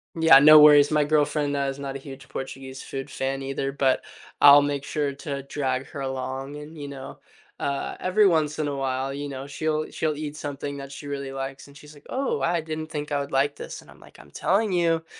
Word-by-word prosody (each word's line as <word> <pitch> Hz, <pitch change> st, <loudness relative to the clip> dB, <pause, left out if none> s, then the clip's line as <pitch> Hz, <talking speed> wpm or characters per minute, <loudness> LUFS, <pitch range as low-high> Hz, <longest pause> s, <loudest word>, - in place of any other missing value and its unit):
Yeah, 160 Hz, -4 st, +7 dB
no 155 Hz, +1 st, +9 dB
worries. 150 Hz, 0 st, +7 dB
My 150 Hz, -1 st, +3 dB
girlfriend, 145 Hz, -1 st, +1 dB
uh, 140 Hz, -, 0 dB
is 135 Hz, -, -6 dB
not 135 Hz, -1 st, -5 dB
a -, -, -5 dB
huge 135 Hz, -1 st, -11 dB
Portuguese 135 Hz, 0 st, -7 dB
food 135 Hz, +1 st, -6 dB
fan 135 Hz, 0 st, -3 dB
either, 135 Hz, 0 st, -3 dB
but 135 Hz, -1 st, +1 dB, 0.4 s
I'll 145 Hz, 0 st, +9 dB
make 145 Hz, -1 st, -2 dB
sure 145 Hz, -1 st, -2 dB
to 140 Hz, 0 st, -6 dB
drag 135 Hz, -2 st, -2 dB
her 140 Hz, -, -7 dB
along 135 Hz, +1 st, -4 dB
and, 150 Hz, +2 st, -10 dB
you 145 Hz, -1 st, -7 dB
know, 135 Hz, -1 st, -9 dB, 0.4 s
uh, 140 Hz, -1 st, -3 dB
every 200 Hz, +3 st, +3 dB
once 155 Hz, -3 st, +1 dB
in 150 Hz, -, 0 dB
a 145 Hz, -, -3 dB
while, 135 Hz, 0 st, -2 dB
you 145 Hz, +1 st, -5 dB
know, 135 Hz, 0 st, -7 dB
she'll 155 Hz, +2 st, -2 dB
she'll 155 Hz, -1 st, -1 dB
eat 150 Hz, -1 st, -5 dB
something 145 Hz, -1 st, -5 dB
that 140 Hz, -1 st, -8 dB
she 145 Hz, +1 st, -9 dB
really 140 Hz, -1 st, -5 dB
likes 135 Hz, +1 st, -6 dB
and 140 Hz, -, -16 dB
she's, 150 Hz, +1 st, -14 dB
like, 145 Hz, -1 st, -18 dB
"Oh, 270 Hz, +1 st, -1 dB
I 170 Hz, 0 st, +1 dB
didn't 155 Hz, 0 st, -5 dB
think 150 Hz, -1 st, -5 dB
I 145 Hz, -1 st, 0 dB
would 140 Hz, -, -7 dB
like 140 Hz, +2 st, +1 dB
this." -, -, -8 dB
And -, -, -20 dB
I'm, -, -, -16 dB
like, -, -, -17 dB
"I'm 70 Hz, -, -16 dB
telling 200 Hz, -, +1 dB
you." 165 Hz, -2 st, +1 dB
145 Hz, 230 wpm, -25 LUFS, 135-150 Hz, 0.4 s, no